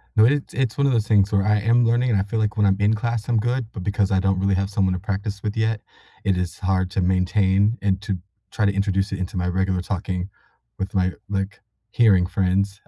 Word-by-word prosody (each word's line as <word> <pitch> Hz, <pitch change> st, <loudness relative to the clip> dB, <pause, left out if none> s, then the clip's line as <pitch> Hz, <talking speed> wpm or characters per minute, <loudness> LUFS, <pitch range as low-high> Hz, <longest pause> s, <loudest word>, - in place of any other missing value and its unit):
No, 110 Hz, -1 st, +6 dB
it's 140 Hz, +3 st, 0 dB
it's 130 Hz, -4 st, -1 dB
one 140 Hz, 0 st, +3 dB
of 135 Hz, -, +2 dB
those 110 Hz, -2 st, +1 dB
things 105 Hz, -2 st, +3 dB
where 100 Hz, -1 st, +2 dB
I 105 Hz, 0 st, +2 dB
am 115 Hz, +3 st, +3 dB
learning, 120 Hz, +2 st, +2 dB
and 105 Hz, -4 st, +2 dB
I 95 Hz, -, +1 dB
feel 110 Hz, +2 st, -3 dB
like 105 Hz, 0 st, -1 dB
when 105 Hz, -, +3 dB
I'm 95 Hz, -1 st, +3 dB
in 105 Hz, +2 st, +3 dB
class, 115 Hz, 0 st, -2 dB
I'm 120 Hz, -2 st, +2 dB
good, 120 Hz, +1 st, -1 dB
but 95 Hz, -, -6 dB
because 100 Hz, 0 st, 0 dB
I 95 Hz, -, +3 dB
don't 95 Hz, 0 st, +1 dB
really 95 Hz, 0 st, +1 dB
have 95 Hz, +1 st, -1 dB
someone 95 Hz, -2 st, +1 dB
to 90 Hz, -, -3 dB
practice 100 Hz, +1 st, -4 dB
with 105 Hz, 0 st, -2 dB
yet, 110 Hz, -1 st, 0 dB, 0.4 s
it 95 Hz, -2 st, +1 dB
is 90 Hz, -1 st, -3 dB
hard 95 Hz, -1 st, 0 dB
to 95 Hz, -, 0 dB
maintain 95 Hz, +4 st, +2 dB
and 95 Hz, -1 st, +1 dB
to 100 Hz, -2 st, -3 dB, 0.3 s
try 110 Hz, -, 0 dB
to 100 Hz, -, +2 dB
introduce 100 Hz, 0 st, 0 dB
it 95 Hz, -, -3 dB
into 95 Hz, 0 st, -4 dB
my 90 Hz, -, -1 dB
regular 95 Hz, 0 st, 0 dB
talking 95 Hz, 0 st, -3 dB, 0.5 s
with 95 Hz, 0 st, -4 dB
my, 95 Hz, -1 st, +1 dB, 0.2 s
like, 100 Hz, 0 st, -3 dB, 0.3 s
hearing 100 Hz, -7 st, +4 dB
friends. 100 Hz, +1 st, 0 dB
100 Hz, 240 wpm, -22 LUFS, 95-110 Hz, 0.5 s, No